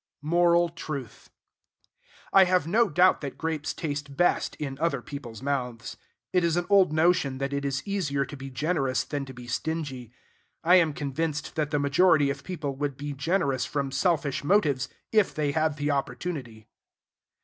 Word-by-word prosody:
Moral 170 +2 +3
Truth. 150 -7 -7 1.0
I 195 -1 +8
have 180 -3 +2
no 215 +6 +3
doubt 180 +3 +4
that 140 -2 -6
grapes 160 -2 -2
taste 145 -3 -5
best 175 +1 +2
in 135 -3 -5
other 155 -4 +1
people's 120 -4 -8
mouths. 125 -4 -3 0.4
It 180 -1 +3
is 170 0 +1
an 175 - 0
old 195 -5 +6
notion 155 -4 +2
that 135 +1 -3
it 140 0 -2
is 135 -1 -2
easier 155 -9 -1
to 145 - -9
be 135 -1 -8
generous 135 -1 0
than 145 -2 -4
to 135 - -10
be 125 0 -10
stingy. 130 -2 -4 0.5
I 175 +3 +6
am 165 -4 +3
convinced 150 +1 -3
that 150 -2 -1
the 150 - 0
majority 145 +1 +4
of - - -7
people 155 -7 -4
would 140 -2 -2
be 145 0 -5
generous 140 -2 0
from 140 -2 -2
selfish 150 -3 0
motives, 145 -8 +2 0.2
if 215 -3 +3
they 150 -2 0
had 155 0 0
the 145 +1 0
opportunity. 135 -6 -4
145 Hz, 170 wpm, -27 LUFS, 140-170 Hz, 1.0 s, I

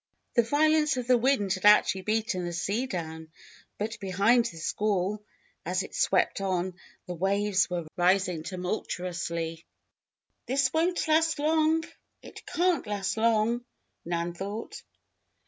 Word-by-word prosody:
The 235 - +5
violence 300 +3 +2
of 250 - -2
the 250 +1 +4
wind 230 -6 +2
had 185 0 -4
actually 205 -2 +5
beaten 215 -2 -1
the 175 0 -4
sea 200 +9 -1
down; 160 -5 -5 0.5
but 215 +2 -4
behind 200 +6 +3
the 165 - -5
squall, 205 +3 -1 0.4
as - - -1
it - - -10
swept - - +1
on, 185 -1 -1 0.3
the 180 - -5
waves 195 +2 +1
were 175 -2 -3
rising 180 -1 +2
tumultuously. 170 -2 -4 0.8
"This 265 0 +1
won't 340 +1 +1
last 320 0 +3
long 315 +2 +2 0.4
it - - -11
can't 355 -5 +1
last 200 -2 -2
long," 230 +1 +2 0.4
Nan 170 0 -2
thought. 200 +5 -6
205 Hz, 130 wpm, -28 LUFS, 180-250 Hz, 0.8 s, The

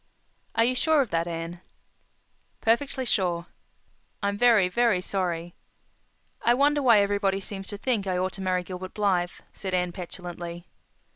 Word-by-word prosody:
"Are 230 - +4
you 250 - +2
sure 310 +3 +3
of 250 - -3
that, 165 0 0
Anne?" 170 +1 -5 1.0
"Perfectly 260 +3 +1
sure." 175 -6 0 0.8
"I'm 200 0 +1
very, 220 -4 +5
very 230 0 +2
sorry." 175 -3 -2 0.9
"I 240 - +4
wonder 290 +2 +3
why 235 -6 +6
everybody 200 -1 +1
seems 195 0 -7
to 205 - -5
think 215 -3 -1
I 185 -1 0
ought 185 +1 -1
to 195 - -7
marry 185 -1 0
Gilbert 185 +1 -7
Blythe," 185 -4 +2 0.2
said 190 -2 -3
Anne 180 -1 0
petulantly. 175 -1 -7
195 Hz, 150 wpm, -26 LUFS, 180-225 Hz, 1.0 s, why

